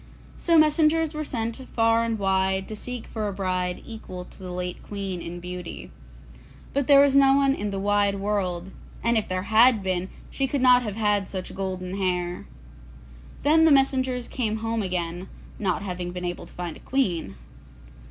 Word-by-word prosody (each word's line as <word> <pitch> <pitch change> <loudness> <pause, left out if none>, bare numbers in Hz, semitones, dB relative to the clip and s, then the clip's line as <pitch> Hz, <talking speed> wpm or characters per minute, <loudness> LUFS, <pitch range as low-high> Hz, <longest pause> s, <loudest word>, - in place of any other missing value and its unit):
So 335 -1 +3
messengers 310 +1 +4
were 305 0 -3
sent 230 -5 -3 0.2
far 230 0 +3
and 230 -1 -1
wide 190 -1 +1
to 215 - -5
seek 245 +2 -6
for 215 -2 -4
a 200 - -3
bride 185 -2 -2
equal 185 -5 -8
to - - -15
the 185 -1 -7
late 180 0 -4
Queen 195 -3 -5
in 175 +1 -6
beauty. 180 -1 -7 0.8
But 280 -1 0
there 280 -1 +8
was 280 -1 +4
no 275 -1 +6
one 275 -1 +3
in 210 -6 -3
the 195 - -3
wide 205 0 +2
world, 195 -3 -2 0.3
and 235 0 +2
if 220 - +1
there 185 0 -2
had 225 +1 +5
been 185 0 -1 0.2
she 270 - 0
could 280 +2 -1
not 250 -1 +6
have 210 -4 -4
had 210 -3 +1
such 185 -2 -5
golden 185 -1 -4
hair. 180 -2 -2 1.0
Then 315 +2 +5
the 320 - +6
messengers 260 -2 +2
came 220 -4 -2
home 225 0 0
again, 180 -1 -3 0.3
not 200 -1 -1
having 180 -2 -4
been 180 0 -5
able 175 0 -4
to - - -16
find 175 -2 -5
a - - -13
queen. 185 - -1
205 Hz, 180 wpm, -25 LUFS, 185-250 Hz, 1.0 s, there